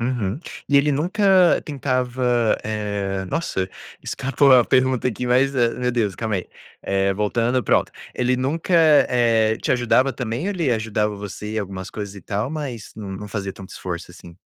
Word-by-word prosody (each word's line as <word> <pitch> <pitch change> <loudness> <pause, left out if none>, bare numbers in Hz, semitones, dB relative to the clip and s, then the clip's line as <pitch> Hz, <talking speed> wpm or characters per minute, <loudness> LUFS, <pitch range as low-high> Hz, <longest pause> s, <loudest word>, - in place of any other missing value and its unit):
Uhum, 115 -1 -2 0.3
e 145 - +4
ele 145 +1 +2
nunca 185 +4 +3
tentava, 125 -4 0
eh 100 -3 -2
nossa, 95 - -2 0.3
escapou 135 +1 +1
a 125 -2 +7
pergunta 130 -1 +2
aqui, 125 0 -2
mas, 130 +3 +3
eh, 120 -3 +3
meu 125 0 0
Deus, 110 -5 0
calma 110 -1 -2
aí, 90 - -5 0.3
eh, 95 0 +1
voltando, 115 +5 0
pronto. - - +1 0.2
Ele 125 +1 +1
nunca, 145 +8 -2
eh, 120 -9 +4
te - - -2
ajudava 125 +2 +3
também 120 +3 -4
ou - - 0
ele 170 -10 0
ajudava 110 -2 -1
você 105 +1 -7
em - - +1
algumas 95 -2 -5
coisas 100 -2 -6
e 100 - -11
tal, 105 +6 -2
mas 140 -8 -6
não 105 -3 -7
não 105 +2 -7
fazia 100 -1 -4
tanto 95 -1 -11
esforço, 90 -2 -6
assim? 85 -1 -13
120 Hz, 175 wpm, -22 LUFS, 105-130 Hz, 0.3 s, a